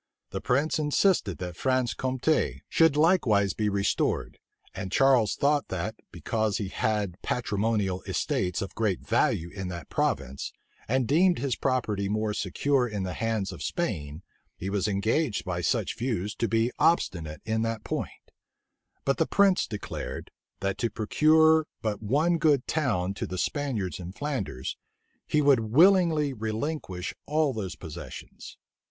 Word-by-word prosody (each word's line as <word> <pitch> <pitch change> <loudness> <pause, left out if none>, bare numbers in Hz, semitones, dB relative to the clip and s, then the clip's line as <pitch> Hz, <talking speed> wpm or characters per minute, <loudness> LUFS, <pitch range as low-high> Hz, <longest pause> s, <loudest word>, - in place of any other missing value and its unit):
The 95 - -4
prince 145 +6 +1
insisted 150 - +2
that 90 0 -6
Franche 130 +2 +1
Compte 130 +4 0
should 165 -3 +4
likewise 120 - +3
be 105 0 0
restored 100 -1 0 0.3
and 95 - -5
Charles 130 -6 +4
thought 145 0 +2
that, 95 +4 -3 0.2
because 110 -3 -1
he 100 -5 -3
had 100 -4 -1
patrimonial 105 -5 -1
estates 90 0 -1
of 95 - -7
great 105 -5 0
value 85 +2 +1
in 95 -2 -5
that 85 -2 -7
province, 65 +2 -1 0.3
and 130 0 +1
deemed 175 +7 +4
his 130 -1 -1
property 110 -7 -1
more 110 0 0
secure 125 +7 +1
in 105 -4 -3
the 90 -1 -3
hands 110 -3 -1
of - - -9
Spain, 80 - -3 0.3
he 95 +2 -4
was 100 0 0
engaged 110 +5 0
by 90 -2 -2
such - - 0
views 110 -5 -2
to 115 - -1
be 115 +2 +1
obstinate 90 - +1
in 110 0 0
that 115 -1 -2
point: - - -5 0.7
but 135 - +2
the 160 - +2
prince 200 -2 +3
declared, 105 -2 -6 0.3
that 100 0 -1
to 115 - +1
procure 155 +8 +4 0.2
but 105 -2 -2
one 155 +10 +2
good 150 -4 +3
town 105 - 0
to - - -4
the 95 - -5
Spaniards 115 - -2
in 90 +1 -7
Flanders, 115 - -4 0.5
he 150 -1 +2
would 140 -3 +5
willingly 155 - +4
relinquish 110 - -3
all 150 -2 +2
those 100 -5 -4
possessions. 80 -2 -9
110 Hz, 145 wpm, -27 LUFS, 100-145 Hz, 0.7 s, would